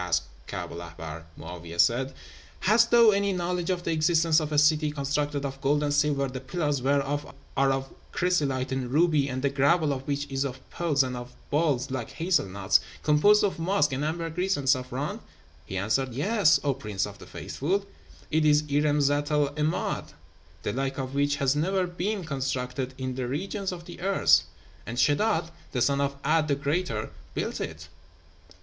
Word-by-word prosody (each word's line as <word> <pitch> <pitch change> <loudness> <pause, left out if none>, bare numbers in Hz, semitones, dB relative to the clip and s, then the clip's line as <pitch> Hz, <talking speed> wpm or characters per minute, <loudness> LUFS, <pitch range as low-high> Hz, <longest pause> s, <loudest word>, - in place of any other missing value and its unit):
asked 85 -3 +1 0.2
Kaab - - -5
el 85 - -7
Ahbár. 80 -1 -8
Mo'áwiyeh 85 +1 -8
said, 130 +7 +3 0.5
'Hast 230 +4 +4
thou 235 -2 +7
any 200 0 +1
knowledge 180 -1 -2
of 180 -1 -1
the 170 - -1
existence 165 0 +3
of 155 -1 -4
a 150 - 0
city 150 +1 +4
constructed 145 0 -1
of 135 0 -5
gold 145 +2 +2
and 145 -1 0
silver, 145 -1 +2
the 130 0 -6
pillars 145 -1 -1
whereof 140 +2 0 0.2
are 135 0 +3
of 135 0 -1 0.2
chrysolite 140 -8 0
and 130 -2 -2
ruby, 150 -2 +3
and 130 +1 -3
the 140 - +3
gravel 145 +2 +3
of 130 - -4
which 145 0 -1
is 135 0 0
of 130 -2 -4
pearls, 150 -5 +2
and 125 -1 -3
of 125 0 -8 0.2
balls 145 -4 +1
like 120 -3 -3
hazel 170 - +1
nuts, 95 +1 +2 0.2
composed 180 +8 +5
of 195 -4 0
musk 165 -3 +2
and 135 +3 -2
ambergris 165 +4 -1
and 140 -2 -5
saffron?' 130 +1 0 0.5
He 95 - -4
answered, 115 +6 0
'Yes, 200 - +3
O 140 -2 +2
Prince 105 -7 -3
of 100 -1 -10
the - - -12
Faithful! 195 +8 -2 0.5
It 155 +1 +2
is 150 0 +4
Irem 145 +1 +2
Zat 145 +1 +1
el 150 -2 +2
'Emád, 150 +5 -2 0.5
the - - -2
like 135 +1 -2
of 130 -1 -4
which 145 +1 +2
hath 140 -1 +1
never 185 +5 +1
been 185 +3 -3
constructed 130 -2 -3
in 130 -1 -3
the 125 -1 -3
regions 190 - -3
of 170 -2 -8
the 175 - -10
earth; 195 +1 +4 0.4
and 120 +2 -6
Sheddád, 165 - +2 0.2
the 125 - 0
son 140 +2 +2
of 140 0 0
'A'd 155 +1 +3
the 140 - +2
Greater, 140 -5 -2 0.2
built - - -2
it.' - - -6
145 Hz, 185 wpm, -27 LUFS, 130-165 Hz, 0.5 s, thou